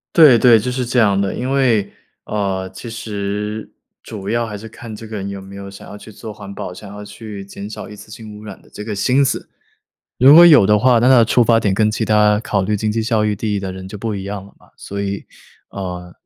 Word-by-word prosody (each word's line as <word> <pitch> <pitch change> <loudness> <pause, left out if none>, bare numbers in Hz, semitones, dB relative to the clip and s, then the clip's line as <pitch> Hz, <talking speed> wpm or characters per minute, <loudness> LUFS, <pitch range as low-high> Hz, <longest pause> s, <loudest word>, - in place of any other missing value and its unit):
对 150 -8 +8
对， 120 -1 +6
就 110 +4 -2
是 125 0 -2
这 125 +1 -2
样 100 -4 +4
的。 100 -1 -1
因 125 +2 -3
为， 120 -7 +2 0.3
呃， 95 -3 -2
其 115 +5 -8
实 105 -1 -4 0.3
主 100 -3 -7
要 115 0 0
还 105 -1 -6
是 110 +2 -10
看 115 0 -10
这 115 - -10
个 110 - -5
人 100 -1 -5
有 100 -1 -6
没 95 +1 -11
有 100 0 -8
想 100 - -12
要 105 - -9
去 105 - -13
做 110 0 -9
环 100 -1 -10
保， 90 - -6
想 100 +3 -11
要 105 +1 -9
去 105 -1 -9
减 100 +1 -9
少 110 - -8
一 105 - -11
次 105 - -13
性 110 0 -10
污 105 - -12
染 100 -3 -9
的 - - -22
这 105 - -9
个 105 -2 -4
心 130 +7 +2
思。 135 - -3 0.7
如 135 +4 +8
果 170 +2 +10
有 150 - +7
的 105 +1 +4
话， 125 +2 +4
那 120 +2 +3
他 130 - +7
的 115 - +6
出 120 +2 +3
发 115 -1 +4
点 105 -3 0
跟 110 +2 +2
其 110 +1 -2
他 105 -1 +3
考 105 -3 -1
虑 105 +3 0
经 105 +1 -1
济 115 +1 -1
效 110 -1 +1
益 105 - 0
第 105 +1 -3
一 - - 0
的 95 -1 -5
人 95 0 -9
就 105 - -8
不 110 +1 -3
一 95 -1 -5
样 100 -1 -6
了 100 - -16
嘛， - - -23
所 100 0 -6
以， 100 0 -4 0.4
啊， 90 -2 -7
105 Hz, 285 characters per minute, -18 LUFS, 100-115 Hz, 0.7 s, 果